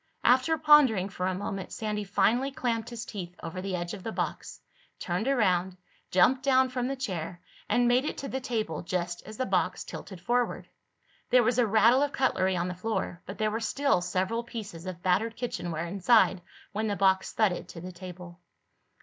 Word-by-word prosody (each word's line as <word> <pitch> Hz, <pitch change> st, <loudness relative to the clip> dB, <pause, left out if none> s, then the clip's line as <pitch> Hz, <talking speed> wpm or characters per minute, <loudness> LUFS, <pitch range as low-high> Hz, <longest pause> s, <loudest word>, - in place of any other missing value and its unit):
After 260 Hz, +6 st, +4 dB
pondering 290 Hz, -11 st, +5 dB
for 185 Hz, -1 st, -3 dB
a 185 Hz, -, -1 dB
moment 195 Hz, -1 st, -5 dB
Sandy 210 Hz, -1 st, -3 dB
finally 240 Hz, +6 st, +2 dB
clamped 235 Hz, -4 st, -2 dB
his 235 Hz, -2 st, -6 dB
teeth 180 Hz, -4 st, -7 dB
over 180 Hz, +3 st, -5 dB
the 190 Hz, -1 st, -3 dB
edge 175 Hz, 0 st, -4 dB
of 200 Hz, -, -7 dB
the 225 Hz, -, -4 dB
box, -, -, -4 dB, 0.4 s
turned 180 Hz, +7 st, -2 dB
around, 190 Hz, -8 st, +2 dB, 0.3 s
jumped 255 Hz, +8 st, +4 dB
down 260 Hz, -1 st, +4 dB
from 250 Hz, -1 st, -2 dB
the 275 Hz, -, -2 dB
chair 180 Hz, -, -4 dB, 0.3 s
and 240 Hz, 0 st, +3 dB
made 245 Hz, +2 st, +4 dB
it -, -, -3 dB
to 275 Hz, -, -5 dB
the 265 Hz, 0 st, -3 dB
table 220 Hz, -, -2 dB
just 175 Hz, 0 st, -3 dB
as 215 Hz, 0 st, -9 dB
the 260 Hz, -, 0 dB
box 185 Hz, -3 st, 0 dB
tilted 190 Hz, -3 st, -9 dB
forward. 240 Hz, +7 st, -1 dB, 0.6 s
There 250 Hz, -1 st, +5 dB
was 245 Hz, +2 st, +2 dB
a 240 Hz, -, +4 dB
rattle 225 Hz, +5 st, +5 dB
of 290 Hz, 0 st, 0 dB
cutlery 190 Hz, -8 st, +1 dB
on 175 Hz, +1 st, -1 dB
the 180 Hz, -, -3 dB
floor, 185 Hz, -2 st, -3 dB
but 195 Hz, -, -7 dB
there 215 Hz, 0 st, 0 dB
were 220 Hz, -, -1 dB
still 275 Hz, -3 st, +1 dB
several 190 Hz, +6 st, -1 dB
pieces 205 Hz, -7 st, -8 dB
of 180 Hz, -1 st, -7 dB
battered 220 Hz, +5 st, +1 dB
kitchenware 175 Hz, -9 st, -3 dB
inside 195 Hz, +1 st, +3 dB, 0.3 s
when 215 Hz, +1 st, -2 dB
the 205 Hz, -, 0 dB
box 190 Hz, -1 st, +2 dB
thudded 205 Hz, -5 st, +1 dB
to 165 Hz, -, -9 dB
the 180 Hz, +1 st, -7 dB
table. 180 Hz, -1 st, -10 dB
210 Hz, 190 wpm, -28 LUFS, 180-245 Hz, 0.6 s, pondering